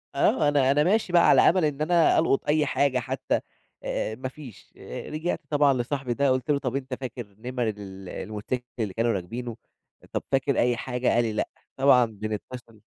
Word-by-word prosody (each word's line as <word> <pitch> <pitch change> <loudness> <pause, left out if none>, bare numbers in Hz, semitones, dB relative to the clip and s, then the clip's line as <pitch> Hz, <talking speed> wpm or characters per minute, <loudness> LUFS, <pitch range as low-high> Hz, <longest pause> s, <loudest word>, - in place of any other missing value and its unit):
آه، 150 - +3
أنا 140 -2 +3
أنا 145 +1 +3
ماشي 190 0 +1
بقى 170 - +6
على - - +7
أمل 175 -2 +4
إن 150 0 -2
أنا 170 +1 +4
ألقُط 150 -4 +1
أي 150 0 +3
حاجة 140 -2 +1
حتى، 130 +1 -1 0.4
آآ، 110 - -2
ما 130 +2 -5
فيش 130 -7 -13
آآ، - - -8
رجعت 160 +3 -2
طبعًا 145 -2 +4
لصاحبي 130 0 -2
ده 140 +2 +2
قُلت 130 +4 +1
له: 140 - +2
"طَب 125 -2 -3
أنت 130 -1 -4
فاكر 120 -6 -7
نِمَر 125 0 -2
ال 95 -3 -8
الموتوسيكل 110 +4 -4
اللي 105 -4 -2
كانوا 115 +1 +1
راكبينه؟ 115 +6 -5 0.5
أ - - -15
طب - - -1
فاكر 135 -1 +1
أي 120 0 +2
حاجة"، 125 0 -3
قال 120 - +3
لي: 110 - -2
"لأ"، - - -1 0.3
طبعًا 130 -3 +6
بنتصل 110 +1 -7
130 Hz, 195 wpm, -26 LUFS, 115-145 Hz, 0.5 s, على